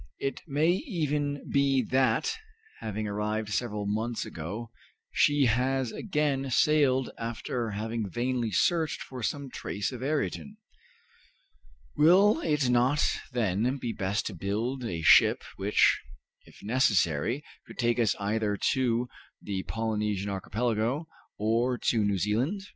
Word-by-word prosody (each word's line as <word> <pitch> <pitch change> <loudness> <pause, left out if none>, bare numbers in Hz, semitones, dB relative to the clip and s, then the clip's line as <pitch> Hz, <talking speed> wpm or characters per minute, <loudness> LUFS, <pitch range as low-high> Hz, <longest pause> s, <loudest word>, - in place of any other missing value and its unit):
It 135 -2 -3
may 150 +3 +2
even 150 - -2
be 140 -2 +3
that, 135 - +2 0.4
having 110 0 -4
arrived 105 +1 -2
several 105 -2 -2
months 110 +3 -2
ago, 105 +8 -6 0.4
she 145 -1 +3
has 125 +1 +1
again 150 -7 -1
sailed 135 -1 +3
after 115 +1 -3
having 110 0 -3
vainly 120 +3 -1
searched 160 +6 +1
for 130 -2 -8
some 140 +4 -3
trace 100 +3 -3
of 125 -2 -7
Ayrton. 155 +9 -2 1.4
Will 190 - +5
it 150 - +1
not 125 +4 +3 0.2
then 120 +2 0
be 120 -3 -4
best 100 +1 -1
to 105 - -3
build 110 +9 -2
a 85 -8 -3
ship - - +6
which, 100 +2 +3 0.4
if - - -17
necessary, 110 - +1 0.2
could - - -12
take 120 0 +1
us 110 -5 +2
either 105 0 0 0.2
to 125 -3 +1 0.3
the 95 -2 -4
Polynesian 105 -3 -1
Archipelago 115 - -1 0.3
or 115 +4 +1
to 115 -3 +1
New 100 -1 +1
Zealand? 120 - 0
120 Hz, 125 wpm, -28 LUFS, 105-135 Hz, 1.4 s, ship